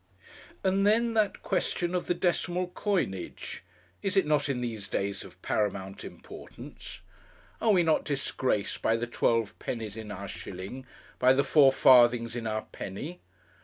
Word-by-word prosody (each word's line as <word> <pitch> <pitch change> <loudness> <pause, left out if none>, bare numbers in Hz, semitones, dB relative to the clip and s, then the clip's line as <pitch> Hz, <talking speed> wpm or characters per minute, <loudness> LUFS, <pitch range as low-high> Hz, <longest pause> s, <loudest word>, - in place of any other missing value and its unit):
And 195 +1 +2
then 230 +2 +3
that 215 -2 +1
question 180 -2 -1
of 180 - -1
the 175 - +1
decimal 175 0 0
coinage! 180 - -3 0.4
is 195 0 -1
it 195 - +5
not 150 -1 +1
in 130 -3 0
these 115 -5 -4
days 100 +1 -2
of - - -14
paramount 100 -2 -2
importance? - - -10 0.6
Are 230 - +2
we 180 -4 +4
not 160 -1 +2
disgraced 130 -6 -1
by 110 - +2
the 115 +1 -1
twelve 115 -2 +1
pennies 110 -4 -4
in 110 -2 -7
our 100 +1 -6
shilling, 100 +11 -7 0.3
by 130 +1 +6
the 140 +1 +3
four 140 -3 +6
farthings 120 -3 +5
in 115 -2 -3
our 110 0 -2
penny? 145 - -6
130 Hz, 155 wpm, -29 LUFS, 110-175 Hz, 0.6 s, by